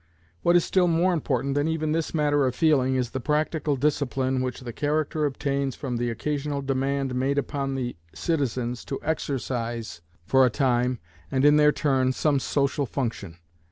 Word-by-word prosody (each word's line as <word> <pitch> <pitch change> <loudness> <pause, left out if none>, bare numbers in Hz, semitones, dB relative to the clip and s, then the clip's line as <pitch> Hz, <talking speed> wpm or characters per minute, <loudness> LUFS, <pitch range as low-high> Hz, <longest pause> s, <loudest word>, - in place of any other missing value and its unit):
What 175 - +3
is 175 - +4
still 185 -2 +3
more 175 +2 +2
important 135 -4 -1
than 145 +2 +1
even 160 -1 -1
this 160 0 -1
matter 145 -3 +2
of 125 - -2
feeling 135 -5 +3
is 125 -2 -1
the 130 - -3
practical 150 +2 0
discipline 130 -2 0
which 130 0 -3
the 120 -2 -7
character 150 +2 0
obtains 140 -1 -2
from 130 -4 -4
the 120 0 -1
occasional 145 +3 -2
demand 135 0 -1
made 135 +3 0
upon 140 -1 -2
the 125 -2 -3 0.2
citizens 125 -7 -2
to 135 - -4
exercise, 120 - -3 0.2
for 130 +6 +4
a 125 - +5
time 125 -1 +1 0.3
and 135 +1 +1
in 145 0 +6
their 150 0 +6
turn, 130 -3 +1
some 145 0 +1
social 140 +1 0
function. 110 - -4
140 Hz, 170 wpm, -25 LUFS, 130-150 Hz, 0.3 s, in